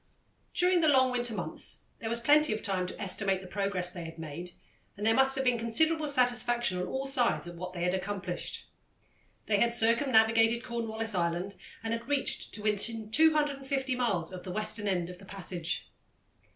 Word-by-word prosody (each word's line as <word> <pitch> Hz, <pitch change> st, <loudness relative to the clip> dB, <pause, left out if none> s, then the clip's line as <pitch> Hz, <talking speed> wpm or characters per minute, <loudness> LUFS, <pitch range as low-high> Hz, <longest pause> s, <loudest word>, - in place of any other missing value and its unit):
During 360 Hz, -1 st, +4 dB
the 315 Hz, -, +3 dB
long 260 Hz, -3 st, +5 dB
winter 240 Hz, -2 st, +1 dB
months -, -, -3 dB, 0.2 s
there 225 Hz, -, -4 dB
was 235 Hz, +1 st, 0 dB
plenty 295 Hz, +3 st, +4 dB
of 215 Hz, -, -5 dB
time 190 Hz, -3 st, 0 dB
to -, -, -8 dB
estimate 195 Hz, 0 st, +1 dB
the 190 Hz, -, -11 dB
progress 190 Hz, -2 st, -1 dB
they 175 Hz, -2 st, -7 dB
had 165 Hz, 0 st, -9 dB
made, 160 Hz, +2 st, -7 dB, 0.5 s
and 205 Hz, -, -4 dB
there 225 Hz, -, +4 dB
must 265 Hz, +2 st, +3 dB
have 265 Hz, -, -1 dB
been 250 Hz, -2 st, +2 dB
considerable 310 Hz, +7 st, +2 dB
satisfaction 240 Hz, -6 st, +1 dB
on 180 Hz, -, -2 dB
all 265 Hz, +1 st, -3 dB
sides 260 Hz, -8 st, +1 dB
at 175 Hz, -, -7 dB
what 180 Hz, +1 st, -6 dB
they 175 Hz, -1 st, -4 dB
had 180 Hz, 0 st, +1 dB
accomplished. 190 Hz, -2 st, -4 dB, 0.8 s
They 205 Hz, -2 st, +2 dB
had 235 Hz, +1 st, +3 dB
circumnavigated 225 Hz, -1 st, +4 dB
Cornwallis 225 Hz, -2 st, -2 dB
Island 175 Hz, +2 st, -1 dB, 0.3 s
and 225 Hz, 0 st, -2 dB
had 230 Hz, +3 st, -5 dB
reached 285 Hz, -1 st, 0 dB
to 210 Hz, -, -5 dB
within 215 Hz, +1 st, -2 dB
250 275 Hz, -3 st, +2 dB
miles 200 Hz, -10 st, 0 dB
of 185 Hz, -1 st, -7 dB
the 185 Hz, -, -8 dB
western 215 Hz, +1 st, -2 dB
end 180 Hz, -3 st, -1 dB
of 180 Hz, -, -12 dB
the 195 Hz, -, -13 dB
passage. 180 Hz, -3 st, -4 dB
225 Hz, 185 wpm, -30 LUFS, 185-250 Hz, 0.8 s, long